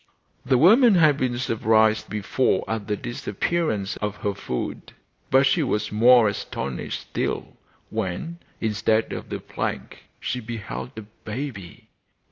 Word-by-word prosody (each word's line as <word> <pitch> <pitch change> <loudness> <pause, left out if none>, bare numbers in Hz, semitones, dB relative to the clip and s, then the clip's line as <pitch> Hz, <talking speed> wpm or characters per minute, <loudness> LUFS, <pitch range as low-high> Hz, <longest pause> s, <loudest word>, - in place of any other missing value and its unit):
The 130 0 +3
woman 220 - +6
had 155 -4 +5
been 125 -3 -1
surprised 110 -2 +2
before 105 +5 0
at 110 -3 -3
the 105 - -1
disappearance 110 - -2
of 105 -1 -3
her 100 -1 -2
food, 65 -10 -5 0.4
but 135 +1 +5
she 165 +5 +3
was 115 -7 -1
more 120 +2 +6
astonished 70 -9 -4
still - - -3 0.4
when, 110 - -3 0.2
instead 110 0 +1
of - - -6
the - - -4
plank, - - -5
she 125 - -3
beheld 115 +1 -6
a 110 - -6
baby. 110 -1 -7
110 Hz, 130 wpm, -24 LUFS, 105-130 Hz, 0.4 s, woman